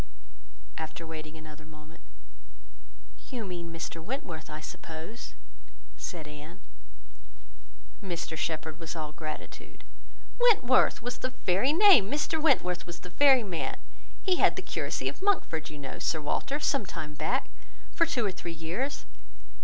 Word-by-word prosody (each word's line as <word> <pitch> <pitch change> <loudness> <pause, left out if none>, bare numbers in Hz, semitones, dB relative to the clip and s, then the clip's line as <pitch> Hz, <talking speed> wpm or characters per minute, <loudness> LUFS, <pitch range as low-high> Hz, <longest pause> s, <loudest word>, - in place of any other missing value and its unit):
After 160 +1 -5
waiting 160 -1 -7
another 155 -1 -11
moment— 155 +1 -14 1.3
"You 240 -4 -3
mean 175 -3 -5
Mr 165 0 -5
Wentworth, 175 - -4
I 155 0 -5
suppose?" 160 +7 -8 0.6
said 160 -4 -5
Anne. 150 +3 -10 1.4
Mr 170 -3 -3
Shepherd 160 0 -2
was 165 0 -5
all 155 -2 -4
gratitude. 155 0 -8 0.6
"Wentworth 265 - +5
was 245 +1 -3
the 255 0 -3
very 195 +10 +4
name! 350 - +8
Mr 300 +3 0
Wentworth 180 - +3
was 170 0 -7
the 180 - -9
very 270 +1 +6
man. 180 -6 -3 0.5
He 370 -2 +3
had - - +5
the - - -4
curacy - - -2
of - - -3
Monkford, 260 - +1
you 155 - -8
know, 140 -2 -6
Sir 160 - +1
Walter, 270 - -1
some 275 -8 +1
time 150 -3 -5
back, 155 - 0 0.4
for 335 - +3
two 255 -9 +1
or 200 - +1
three 175 -2 -6
years. 170 - -3
170 Hz, 140 wpm, -30 LUFS, 155-255 Hz, 1.4 s, name